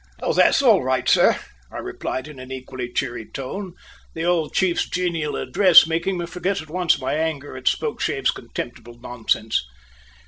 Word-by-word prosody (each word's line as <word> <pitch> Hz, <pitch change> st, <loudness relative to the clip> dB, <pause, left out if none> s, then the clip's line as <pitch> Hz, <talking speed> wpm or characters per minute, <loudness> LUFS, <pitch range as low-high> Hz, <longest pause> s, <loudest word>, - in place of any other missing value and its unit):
"Oh, -, -, -1 dB
that's -, -, +4 dB
all -, -, +5 dB
right, 130 Hz, 0 st, 0 dB
sir," -, -, +5 dB, 0.3 s
I -, -, -7 dB
replied 130 Hz, -, -4 dB
in 150 Hz, -4 st, -11 dB
an 130 Hz, 0 st, -10 dB
equally 130 Hz, -1 st, -6 dB
cheery 120 Hz, -1 st, -2 dB
tone, 180 Hz, +8 st, -6 dB, 0.4 s
the 160 Hz, -, -3 dB
old 170 Hz, -3 st, +1 dB
chief's 185 Hz, -2 st, +1 dB
genial 170 Hz, -4 st, -1 dB
address 185 Hz, -4 st, +6 dB
making 170 Hz, +3 st, -1 dB
me 175 Hz, -, -3 dB
forget 180 Hz, +3 st, -2 dB
at 155 Hz, -1 st, -10 dB
once 180 Hz, -1 st, +2 dB
my 130 Hz, -, -2 dB
anger 150 Hz, -3 st, -2 dB
at 130 Hz, -1 st, -8 dB
Spokeshave's -, -, 0 dB
contemptible 120 Hz, 0 st, -8 dB
nonsense. 115 Hz, -, -1 dB
155 Hz, 165 wpm, -22 LUFS, 130-175 Hz, 0.4 s, address